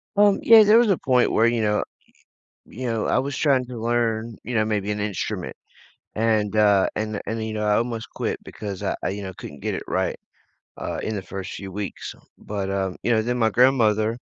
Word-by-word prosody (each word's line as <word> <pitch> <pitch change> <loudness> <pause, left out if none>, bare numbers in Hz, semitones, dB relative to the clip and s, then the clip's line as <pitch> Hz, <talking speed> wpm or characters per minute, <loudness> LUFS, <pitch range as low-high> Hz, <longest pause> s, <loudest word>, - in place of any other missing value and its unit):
Um, 205 -1 +4
yeah, 225 -1 +8
there 210 +2 +6
was 235 -3 +3
a 190 - +3
point 125 -2 +2
where, 115 - +3
y 120 - +1
you 115 - 0
know, 105 -1 +1 0.8
you 130 +2 -6
know, 115 -2 -1
I - - +2
was 140 +1 -2
trying 135 -4 +2
to 120 -2 -7
learn, 115 -1 -1
you 120 +2 -4
know, 110 -1 +3
maybe 105 -1 -1
an 105 0 -2
instrument 105 -2 -3 0.6
and, 110 -2 +1
uh, 100 -2 +4
and 110 -1 -3
and, 110 0 -3
you 110 - -4
know, 105 -1 -2
I 105 - +3
almost 115 -1 -2
quit - - -2
because 100 -3 -7
I - - -1
I, - - 0
you 100 +1 -5
know, 95 -1 -6
couldn't 70 -1 -10
get - - -2
it - - -4
right, - - -1 0.6
uh, - - -4
in 110 - -3
the 100 - -4
first 95 0 -7
few 95 -1 -7
weeks. 100 0 -6 0.2
But, 100 -2 -4
uh, 95 -1 -1
you 120 - -1
know, 110 - +3
then 125 +2 -1
my 110 -1 +3
grandmother, 115 -2 +3
110 Hz, 220 wpm, -23 LUFS, 105-120 Hz, 0.8 s, yeah